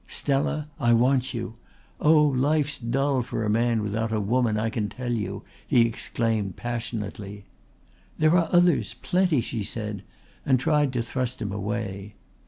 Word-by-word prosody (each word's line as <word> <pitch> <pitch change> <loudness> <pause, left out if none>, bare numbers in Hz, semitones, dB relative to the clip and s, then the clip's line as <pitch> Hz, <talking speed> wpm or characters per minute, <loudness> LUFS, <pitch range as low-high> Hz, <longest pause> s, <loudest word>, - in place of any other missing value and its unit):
"Stella, 145 +2 0
I 120 -4 +3
want 130 +2 +3
you. 115 -2 -4 0.5
Oh, 150 0 +5
life's 145 +1 +1
dull 135 +2 0
for 115 -1 -3
a 105 - +1
man 115 0 +2
without 110 +2 -2
a 110 - 0
woman; 110 +1 +1
I 110 +1 -1
can 105 -2 -2
tell 125 0 -4
you," 110 -3 -3 0.2
he 120 - +4
exclaimed 115 -3 -1
passionately. 105 -4 -5 0.7
"There 155 +2 +4
are 170 -3 +2
others 175 -1 +3
plenty," 180 -7 +2
she 115 -1 -4
said, 105 -1 -4 0.4
and 130 -2 +3
tried 150 -1 +2
to 120 -2 0
thrust 130 +1 -3
him 100 - -3
away. 100 0 -4
120 Hz, 155 wpm, -25 LUFS, 110-140 Hz, 0.7 s, Oh